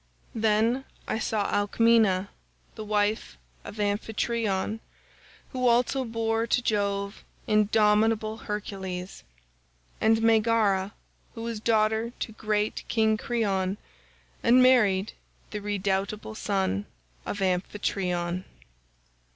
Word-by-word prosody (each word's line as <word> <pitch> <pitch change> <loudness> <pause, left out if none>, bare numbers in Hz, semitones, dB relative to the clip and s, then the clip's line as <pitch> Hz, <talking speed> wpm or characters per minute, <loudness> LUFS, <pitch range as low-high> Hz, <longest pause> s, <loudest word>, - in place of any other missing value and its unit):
"Then 225 +4 +1 0.2
I 220 - -1
saw 215 -2 -1
Alcmena, 205 -2 +3 0.4
the 220 - -7
wife 210 - -1 0.3
of 210 - -9
Amphitryon, 210 0 -1 0.7
who 255 -1 0
also 245 +3 +2
bore 225 0 -1
to 240 - +2
Jove 200 -3 -1 0.2
indomitable 215 +1 +2
Hercules; 190 -4 -5 0.8
and 225 0 +3
Megara 220 -3 +2 0.4
who 225 - -6
was 230 -2 -4
daughter 220 +1 +1
to - - -4
great 215 -1 -1
King 220 -1 +2
Creon, 200 -4 -1 0.6
and 250 +2 +5
married 215 -6 +4 0.4
the 210 - -4
redoubtable 200 +1 -2
son 190 - -1 0.4
of 205 - -3
Amphitryon. 180 -1 -1
215 Hz, 95 wpm, -27 LUFS, 200-225 Hz, 0.8 s, and